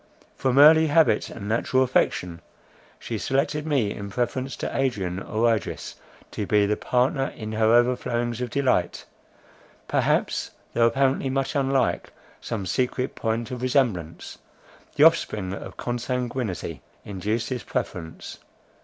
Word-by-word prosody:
From 130 0 0
early 160 +2 +8
habit, 160 +2 +3
and 100 -3 -8
natural 120 +4 +2
affection, 90 -9 0 0.6
she - - -5
selected 150 +3 -1
me 130 -9 +1
in 100 0 -7
preference 125 +5 -2
to - - -5
Adrian 95 -9 -1
or 115 +3 +1
Idris, 105 - -6 0.4
to 105 - -4
be 105 -1 +3
the 105 +1 +1
partner 130 +4 +1
in 110 -1 -6
her 110 0 +1
overflowings 120 0 +1
of 125 - -2
delight; 130 -9 0 0.8
perhaps, - - 0 0.2
though 115 0 +4
apparently 135 +2 +1
much 135 0 -1
unlike, 135 -3 0 0.3
some 105 -4 -4
secret 125 +5 -1
point 115 +1 -2
of 125 -1 -5
resemblance, 120 - -1 0.6
the 145 - +4
offspring 110 - +3
of - - -8
consanguinity, 120 - -3 0.2
induced 105 +4 -2
this 125 -3 -3
preference. 80 -2 -5
120 Hz, 130 wpm, -25 LUFS, 105-135 Hz, 0.8 s, early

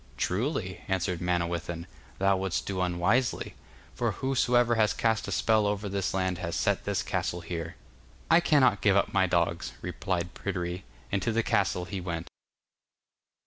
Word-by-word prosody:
'Truly,' 95 - -1
answered 95 -2 -1
Manawyddan, 85 -1 -1 0.3
'thou 95 0 +3
wouldst 95 -2 -1
do 95 -2 -2
unwisely, 90 +8 +1 0.4
for - - -1
whosoever 125 -2 +2
has 110 -2 +3
cast 110 -2 +1
a - - -4
spell 110 +1 +3
over 105 0 -1
this 100 -1 -1
land 95 -2 -1
has 85 -2 -3
set - - +1
this - - 0
castle 85 - -2
here.' 85 -1 -5 0.6
'I 165 - +8
cannot 140 -10 +4
give 100 -2 +4
up 100 - +1
my 95 -1 +4
dogs,' 85 0 0
replied 90 0 -3
Pryderi, 90 -1 -4 0.3
and 100 - +1
to 115 - 0
the 115 +1 +1
castle 90 -4 +1
he 95 0 -5
went. 85 -2 -4
95 Hz, 155 wpm, -28 LUFS, 85-105 Hz, 0.6 s, I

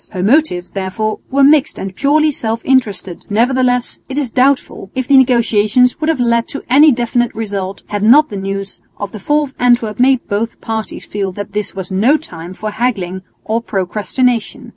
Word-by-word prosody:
Her 185 -2 -3
motives 215 - +1
therefore 200 +3 -3
were 275 +1 +2
mixed 290 +1 +4
and 190 -1 -6
purely 305 +4 +2
self 225 -4 -3
interested; 205 -9 0
nevertheless 245 +3 +1
it 265 - -5
is 275 -5 -1
doubtful 260 -6 0
if 260 -1 -2
the 280 - +4
negotiations 245 0 +3
would 310 - 0
have 320 -5 0
led 235 -1 +1
to 280 - -7
any 295 +3 +7
definite 240 -1 -1
result, 200 -3 -4
had 205 -1 -4
not 275 +9 +5
the 205 - -7
news 195 0 -5 0.2
of 205 -1 -5
the 215 - -8
fall 295 +9 +1
of 275 -2 -8
Antwerp 240 -3 +2
made 260 0 +3
both 220 +3 -3
parties 220 -1 -5
feel 200 -2 -3
that 205 +1 -7
this 210 -1 -3
was 190 -1 -6
no 225 +11 +3
time 175 - -10
for 215 +2 -5
haggling 200 -6 -2 0.2
or 225 +2 -1
procrastination. 220 +4 -2
230 Hz, 185 wpm, -15 LUFS, 200-260 Hz, 0.2 s, any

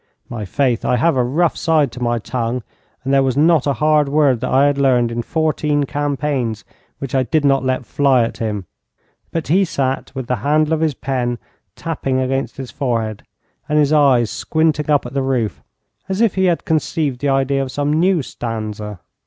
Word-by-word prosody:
My 115 -3 -5
faith, 125 +2 0
I - - +2
have 140 +6 +2
a 125 - +2
rough 155 +7 +1
side 155 -6 +1
to 125 - -9
my 120 0 +1
tongue, 120 +1 -3 0.4
and 135 +1 -1
there 135 - +5
was 135 -1 0
not 155 -1 +4
a 140 - +2
hard 150 +1 +2
word 140 -4 +3
that 130 - -3
I 135 +2 +4
had 145 -1 +1
learned 125 -4 +3
in 120 0 -2
fourteen 150 0 0
campaigns 140 -6 -2 0.3
which 135 -2 -6
I 135 - +3
did 145 +3 0
not 135 -1 +3
let 130 0 -1
fly 135 -3 +3
at 115 - -4
him; 105 -4 -3 0.6
but 165 -3 -4
he 190 +5 +4
sat 135 -6 -2
with 130 -2 -4
the 125 +1 -1
handle 150 +6 +1
of 160 - +1
his 155 -3 0
pen 125 -3 -2 0.4
tapping 135 -5 -2
against 135 +1 -2
his 135 -2 -7
forehead 115 -5 -2 0.5
and 150 - +2
his 150 0 +3
eyes 135 -6 +4
squinting 155 -1 0
up 145 -3 +3
at 120 - -7
the 140 - 0
roof 130 -5 -1 0.5
as 190 +1 -2
if 230 -3 +3
he 190 0 +1
had 175 -2 +1
conceived 155 -4 -1
the 145 - 0
idea 135 0 +1
of 135 -1 -4
some 145 +1 -1
new 170 0 +2
stanza. 110 -5 -5
135 Hz, 200 wpm, -18 LUFS, 125-150 Hz, 0.6 s, there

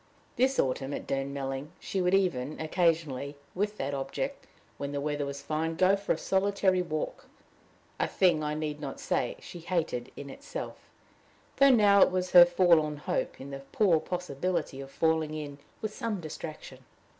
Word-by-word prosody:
This 265 +2 +2
autumn, 135 +1 0
at - - -6
Durnmelling, 135 +2 -3
she 190 - -2
would 180 +1 +3
even, 155 -7 0
occasionally, 155 -4 0 0.2
with 205 +3 -1
that 140 +1 -2
object, 140 - -4 0.3
when 140 0 -4
the 145 - -1
weather 145 0 -2
was 140 0 -6
fine, 160 +1 -1
go 185 +3 +4
for 200 0 -3
a - - -4
solitary 190 -1 +2
walk 155 -3 -4 0.7
a - - +2
thing, 175 -5 +3
I 150 0 -1
need 150 -1 -3
not 135 -2 -5
say, - - -1
she 175 - -10
hated 160 -8 -2
in 140 -1 -7
itself, - - -8 0.7
though 275 0 +7
now 205 -5 +6
it - - +7
was 185 0 -2
her 175 -1 +10
forlorn 170 -4 +3
hope, 145 - -2
in 140 +1 -8
the 135 - -5
poor 185 -7 +4
possibility 175 -4 -3
of 135 - -9
falling 160 +1 +1
in 145 -2 -6 0.2
with 215 -1 -2
some 220 -3 -3
distraction. 155 -4 -8
160 Hz, 170 wpm, -29 LUFS, 140-185 Hz, 0.7 s, her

